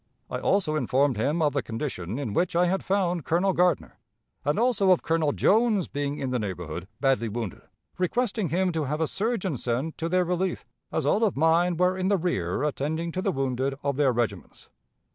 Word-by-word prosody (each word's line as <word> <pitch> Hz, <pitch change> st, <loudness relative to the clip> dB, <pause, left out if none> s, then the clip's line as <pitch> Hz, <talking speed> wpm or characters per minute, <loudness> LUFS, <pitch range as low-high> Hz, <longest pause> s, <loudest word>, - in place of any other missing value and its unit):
I -, -, -2 dB
also 195 Hz, -6 st, +1 dB
informed 135 Hz, -1 st, +2 dB
him 145 Hz, +10 st, 0 dB
of 145 Hz, -2 st, +2 dB
the 140 Hz, -, +1 dB
condition 115 Hz, -, -4 dB
in 130 Hz, -8 st, -3 dB
which 175 Hz, -, 0 dB
I 175 Hz, +1 st, +4 dB
had 190 Hz, +2 st, 0 dB
found 180 Hz, -4 st, 0 dB
Colonel 180 Hz, +6 st, +1 dB
Gardner, 180 Hz, 0 st, +1 dB, 0.4 s
and 145 Hz, +5 st, 0 dB
also 230 Hz, -4 st, +3 dB
of 185 Hz, -, +4 dB
Colonel 160 Hz, -2 st, +1 dB
Jones 215 Hz, +1 st, +3 dB
being 145 Hz, 0 st, -3 dB
in 130 Hz, -2 st, -3 dB
the 125 Hz, -, 0 dB
neighborhood 90 Hz, -4 st, -5 dB
badly 135 Hz, -4 st, +1 dB
wounded, 110 Hz, -3 st, -5 dB, 0.4 s
requesting 210 Hz, 0 st, 0 dB
him 185 Hz, +2 st, +1 dB
to 160 Hz, -3 st, -1 dB
have 150 Hz, +3 st, -2 dB
a 160 Hz, -, +2 dB
surgeon 195 Hz, -, -1 dB
sent 125 Hz, +7 st, -2 dB
to 165 Hz, -, -2 dB
their 180 Hz, +1 st, +2 dB
relief, 180 Hz, +2 st, -1 dB, 0.3 s
as -, -, -1 dB
all 215 Hz, -, +2 dB
of 205 Hz, -10 st, +1 dB
mine 165 Hz, +3 st, +3 dB
were 180 Hz, +1 st, +3 dB
in 185 Hz, 0 st, -1 dB
the 200 Hz, 0 st, +3 dB
rear 120 Hz, -, -1 dB
attending 155 Hz, +3 st, -2 dB
to 185 Hz, -, -3 dB
the 195 Hz, 0 st, +1 dB
wounded 135 Hz, -2 st, -1 dB
of 140 Hz, -1 st, 0 dB
their 140 Hz, -2 st, +3 dB
regiments. 120 Hz, -4 st, -3 dB
160 Hz, 200 wpm, -26 LUFS, 135-185 Hz, 0.4 s, I